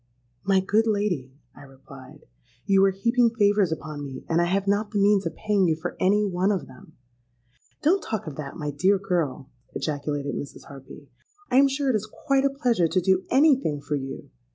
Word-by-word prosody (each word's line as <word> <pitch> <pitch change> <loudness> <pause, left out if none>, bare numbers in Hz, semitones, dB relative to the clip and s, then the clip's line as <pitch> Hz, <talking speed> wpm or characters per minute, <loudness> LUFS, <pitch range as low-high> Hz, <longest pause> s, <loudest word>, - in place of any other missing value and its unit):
'—'My 195 0 +3
good 215 +4 +1
lady,' 200 - -1 0.2
I - - -14
replied, 135 -1 -15 0.4
'you 195 -1 +4
are - - +4
heaping 235 +5 +2
favours 205 -4 +3
upon 155 -2 -5
me, 135 -2 -8
and 165 +1 +2
I - - +2
have 195 +3 0
not 205 +1 +1
the 210 - -3
means 200 -2 +3
of 160 - -6
paying 205 -3 +1
you 160 - +2
for 160 - -6
any 205 +3 +3
one 190 +1 0
of 185 -9 -2
them.'—'Don't 125 - -6
talk 220 -3 -4
of 155 -4 -7
that, 140 -2 -7
my 150 -3 -3
dear 185 +8 +2
girl,' 160 -8 -2 0.2
ejaculated 145 -1 -3
Mrs. 140 - -7
Harpy. 140 +1 -13 0.4
'I'm 270 +3 +6
sure 275 0 0
it - - 0
is 215 0 -3
quite 275 -1 0
a - - +4
pleasure 245 - +1
to 175 +3 +1
do 190 +1 +2
any 285 +2 +5
thing 150 - -2
for 145 - -5
you. 135 -1 -7
185 Hz, 195 wpm, -25 LUFS, 145-210 Hz, 0.4 s, I'm